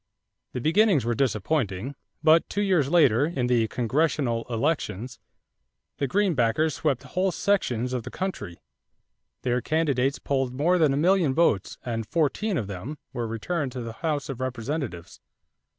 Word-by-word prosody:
The 125 - -3
beginnings 165 - +3
were 120 - +1
disappointing; 115 -1 -1 0.3
but 160 +1 +5
two 205 - -1
years 175 -9 +2
later, 145 -5 +4
in 135 -7 -1
the 120 -2 +2
congressional 125 0 0
elections, 125 - -2 0.8
the 140 - +1
Greenbackers 155 - +2
swept 130 -2 -1
whole 185 +1 0
sections 125 - 0
of 125 - -1
the - - -8
country. 110 - -5 0.9
Their 125 0 +1
candidates 140 -4 +1
polled 135 -2 -1
more 175 +6 +2
than 155 -4 +4
a 135 - 0
million 170 -3 +3
votes 160 - +2
and 115 -3 -3
fourteen 170 - 0
of 115 - -1
them 100 +10 -6 0.2
were 120 -1 -2
returned 130 +5 -3
to 125 - -4
the 115 -1 -6
House 150 0 -2
of 130 -2 -6
Representatives. 130 - -4
135 Hz, 150 wpm, -26 LUFS, 120-160 Hz, 0.9 s, but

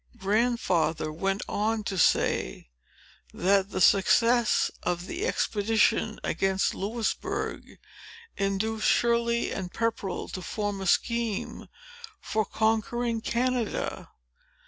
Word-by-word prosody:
Grandfather 195 -7 0
went 195 +5 -1
on 215 +1 -1
to 200 - -3
say, 65 - +1 0.6
that 195 +1 +2
the - - -3
success 230 +6 +4
of 175 0 -2
the 375 - -3
expedition 220 - +1
against 195 0 0
Louisbourg, 220 +3 -3 0.6
induced 200 +3 -1
Shirley 235 0 +2
and 185 -2 -4
Pepperell 225 -5 -2
to 185 - -6
form 205 +1 -3
a 190 - -3
scheme 230 +2 0 0.5
for 215 -1 -1
conquering 225 +2 0
Canada. 245 -1 -2
215 Hz, 100 wpm, -27 LUFS, 195-235 Hz, 0.6 s, success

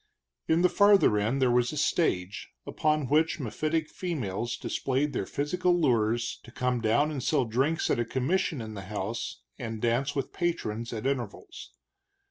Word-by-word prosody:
In 165 +2 +3
the - - +7
farther 200 - +5
end 115 +7 0
there 125 - +4
was 120 0 +2
a 155 - -6
stage, 100 - 0 0.2
upon 155 -3 0
which 155 +5 +2
mephitic 155 +5 -1
females 120 - -3
displayed 135 +4 -1
their - - -2
physical 175 +5 0
lures, 120 -5 +1
to - - -14
come 125 0 -1
down 120 +8 +2
and 140 -4 -3
sell 125 - +1
drinks 135 +8 0
at - - +1
a - - +2
commission 135 +4 0
in 110 -1 -6
the 100 -3 -7
house, 105 +1 -4 0.2
and 115 -2 -4
dance 120 +5 0
with 135 -2 -2
the - - -20
patrons, 120 -10 -2
at 110 -1 -5
intervals. 130 -6 -4
125 Hz, 170 wpm, -28 LUFS, 115-155 Hz, 0.2 s, the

